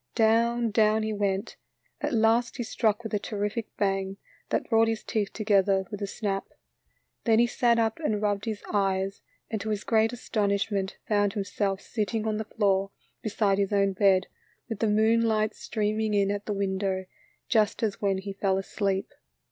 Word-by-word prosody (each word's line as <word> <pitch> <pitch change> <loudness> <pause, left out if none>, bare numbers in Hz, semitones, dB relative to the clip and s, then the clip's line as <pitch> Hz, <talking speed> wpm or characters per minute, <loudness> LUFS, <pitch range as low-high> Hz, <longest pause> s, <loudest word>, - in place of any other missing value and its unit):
Down, 230 +1 +3
down 215 0 +3
he 215 0 -1
went, 200 -1 -1 0.4
at 295 +1 -1
last 230 0 +2
he 240 - -2
struck 220 -1 0
with 220 - -6
a 210 - +2
terrific 210 +2 -3
bang 195 -1 0 0.3
that - - 0
brought 225 0 +4
his 225 -1 -2
teeth 210 -3 -1
together 200 -3 +2
with 205 -1 -6
a 200 - -1
snap. 195 -2 -3 0.8
Then 225 -2 +4
he 235 - +5
sat 240 0 +2
up 225 +2 +1
and 220 -10 0
rubbed 205 -1 0
his 215 -3 -4
eyes, 195 -1 0 0.3
and 220 -2 -2
to 220 - -4
his 210 -1 -2
oreat 225 0 +3
astonishment 200 -4 -1
found 205 -3 +2
himself 195 -1 -2
sitting 220 0 -2
on 215 -1 0
the 220 - -3
floor 195 -3 +1 0.3
beside 205 -2 +1
his 200 0 0
own 200 -1 +2
bed, 190 -1 +4 0.4
with 225 -4 -5
the 225 - +2
moon 220 +2 +3
light 215 -2 +1
streaming 215 0 -1
in 200 -1 +2
at 205 0 -4
the - - -1
window, 190 -1 -1 0.4
just 220 -1 +2
as 210 -3 -1
when 195 -2 +1
he 195 +1 -5
fell 195 -1 0
asleep. 195 0 -2
210 Hz, 180 wpm, -27 LUFS, 195-220 Hz, 0.8 s, he